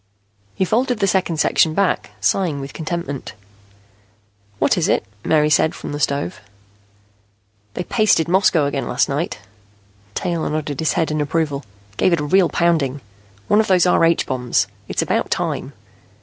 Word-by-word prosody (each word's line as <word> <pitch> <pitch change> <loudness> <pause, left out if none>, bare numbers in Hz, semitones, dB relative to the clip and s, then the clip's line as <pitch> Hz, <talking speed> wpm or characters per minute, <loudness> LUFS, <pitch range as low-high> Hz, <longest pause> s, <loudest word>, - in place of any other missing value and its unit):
He 190 - +1
folded 245 +5 +1
the 200 - +2
second 185 -4 0
section 155 +1 +2
back, 200 -2 0
sighing 145 - 0
with 135 0 -7
contentment. 160 -4 -5 1.2
"What - - +2
is - - 0
it?" - - +1 0.2
Mary 150 -1 +2
said, 155 - +3
from - - -7
the 145 - -4
stove. 140 -11 -1 1.4
"They - - -2
pasted 205 -6 +2
Moscow 175 -4 +3
again 140 -1 -2
last 125 - +1
night." 145 +5 -2 0.8
Taylor 170 -3 -2
nodded 150 -2 -3
his 160 - +1
head 165 -3 0
in 155 0 0
approval. 150 -2 -1 0.3
"Gave 180 - +3
it 170 - +2
a - - -2
real 185 +4 +3
pounding. 160 -6 +1 0.5
One 210 - +4
of 220 - +2
those 185 -2 +4
R 180 - +3
H 165 0 +3
bombs. 125 -6 0 0.2
It's - - -1
about - - -1
time." - - -2
160 Hz, 160 wpm, -20 LUFS, 145-180 Hz, 1.4 s, One